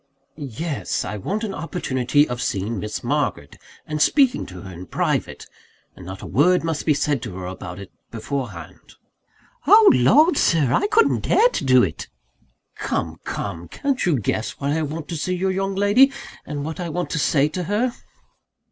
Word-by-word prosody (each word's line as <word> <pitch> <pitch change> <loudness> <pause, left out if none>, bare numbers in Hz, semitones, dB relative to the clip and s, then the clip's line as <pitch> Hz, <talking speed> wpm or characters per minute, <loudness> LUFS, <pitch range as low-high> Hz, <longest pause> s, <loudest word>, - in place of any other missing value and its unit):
"Yes. 145 +1 -4
I 105 +3 -4
want 205 - -3
an 205 -3 -3
opportunity 145 -4 0
of 125 0 -4
seeing 100 +3 -2
Miss 105 +2 -5
Margaret, - - -2 0.3
and 150 0 -3
speaking 270 - +3
to 90 -1 -10
her 95 - -9
in 90 +2 -10
private - - -2 0.5
and 90 - -12
not 95 0 -8
a - - -6
word 170 - +3
must 165 -2 -3
be 150 - +4
said 145 -3 0
to 105 -7 -7
her 95 - -6
about 90 -1 -7
it, 100 -1 -10 0.2
beforehand." 115 - -6 0.7
"Oh 425 +2 +8
Lord, 290 - +4
Sir! 145 -7 +2
I 410 - +2
couldn't 440 +2 +2
dare 480 - +4
to - - -3
do 130 -2 +5
it!" 80 -5 -3 0.7
"Come! - - -3
come! 85 +1 -5
Can't 275 - -2
you 170 -5 +2
guess 110 +1 -2
why 140 +1 -1
I 160 - 0
want 155 0 -4
to 170 - -3
see 180 +4 -2
your 190 +1 0
young 195 +1 -2
lady, 205 +8 +5 0.4
and 145 -1 -4
what 160 +2 -5
I 175 -2 -3
want 175 +3 -3
to 165 - -1
say 145 0 +3
to 180 +3 -4
her?" 225 +6 0
150 Hz, 185 wpm, -22 LUFS, 115-185 Hz, 0.7 s, Oh